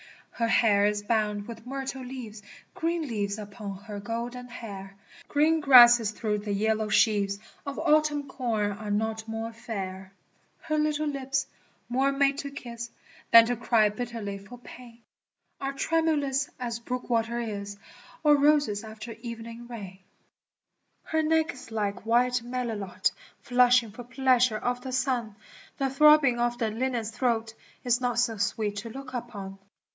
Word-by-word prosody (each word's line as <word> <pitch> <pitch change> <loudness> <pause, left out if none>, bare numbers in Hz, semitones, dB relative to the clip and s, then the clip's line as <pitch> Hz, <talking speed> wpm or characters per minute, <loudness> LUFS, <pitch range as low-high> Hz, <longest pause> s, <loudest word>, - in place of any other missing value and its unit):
Her 230 - -1
hair 205 -3 +4
is 210 0 -1
bound 210 -2 0
with 230 0 -9
myrtle 270 0 -4
leaves, 245 -5 -8 0.3
(Green 335 0 -1
leaves 205 -6 -2
upon 205 -1 -7
her 210 -2 -7
golden 235 +4 -5
hair 195 -5 -9 0.2
!) - - -20
Green 310 +2 +3
grasses 240 -6 +8
through 210 -1 -2
the 205 0 -5
yellow 215 +1 0
sheaves 205 -1 +3 0.3
Of 280 -1 -6
autumn 300 -2 +2
corn 220 -6 -1
are 210 +1 -7
not 220 +1 -1
more 225 +1 -4
fair. 195 -5 -6
cm] - - -30
Her 310 -1 0
little 305 0 0
lips, 275 -1 -1 0.4
more 265 +3 +2
made 275 0 +2
to 280 - -4
kas 235 -4 -7 0.4
Than 230 0 +9
to 245 +1 0
cry 230 -2 +3
bitterly 215 -2 -5
far 210 +5 -12
pain, 240 -1 -14 0.6
Are 275 0 -3
tremulous 290 -3 +1
as 235 -2 -3
brook 250 +2 -5
water 235 0 0
b» 215 -4 -3 0.6
Or 300 -1 +6
roses 285 -8 +3
after* 220 +1 -8 1.9
Her 320 0 0
neck 320 0 +2
is 255 - -12
like 210 -1 -3
white 245 +1 +3
mctilotr 215 -6 -2 0.3
flushing 245 -2 +4
far 240 +3 -10
pleasure 255 -2 +2
of 245 +2 -2
the 260 0 -6
son, 250 -4 -1 0.4
The 270 -1 0
throbbing 280 -3 +6
of 240 0 0
the 225 -2 -1
linnet's 235 -1 -2
throat 230 -2 -1 0.3
Is 245 0 +2
not 245 -2 0
so 235 -2 +1
sweet 205 0 -1
to 220 +3 -5
look 265 +2 -9
upon. 200 -6 -6
235 Hz, 150 wpm, -27 LUFS, 215-260 Hz, 1.9 s, Than